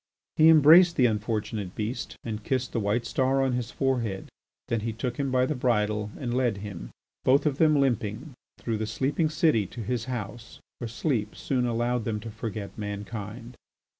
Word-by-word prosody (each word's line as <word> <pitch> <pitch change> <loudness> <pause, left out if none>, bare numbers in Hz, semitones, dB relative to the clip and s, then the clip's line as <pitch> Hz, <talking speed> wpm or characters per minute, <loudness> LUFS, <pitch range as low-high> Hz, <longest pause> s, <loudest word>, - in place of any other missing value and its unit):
He 160 +1 +7
embraced 165 +3 +7
the 125 - +4
unfortunate 105 -3 -2
beast 115 +3 -4
and 110 -2 -5
kissed 130 0 -1
the 115 - 0
white 105 +3 0
star 135 +1 +1
on 130 -1 +1
his 120 -2 -2
forehead. 120 -8 -1 0.4
Then 115 - 0
he 115 +1 -3
took 120 +2 -4
him 140 -1 -1
by 130 0 +3
the 155 - -1
bridle 105 -5 0
and 120 -3 -3
led 125 -4 +1
him, 100 -5 -7 0.3
both 135 +4 +4
of 145 -2 0
them 155 -2 +5
limping, 125 +1 -1 0.3
trough 115 -3 -2
the 110 - -2
sleeping 140 +8 0
city 155 - +2
to 115 - -7
his 115 +1 -2
house, 120 -2 -6 0.2
where 120 - -4
sleep 115 -2 -2
soon 125 -2 -1
allowed 120 0 0
them 110 -2 -1
to 115 0 -7
forget 105 -2 -6
mankind. 105 +3 -6
120 Hz, 180 wpm, -27 LUFS, 105-130 Hz, 0.4 s, He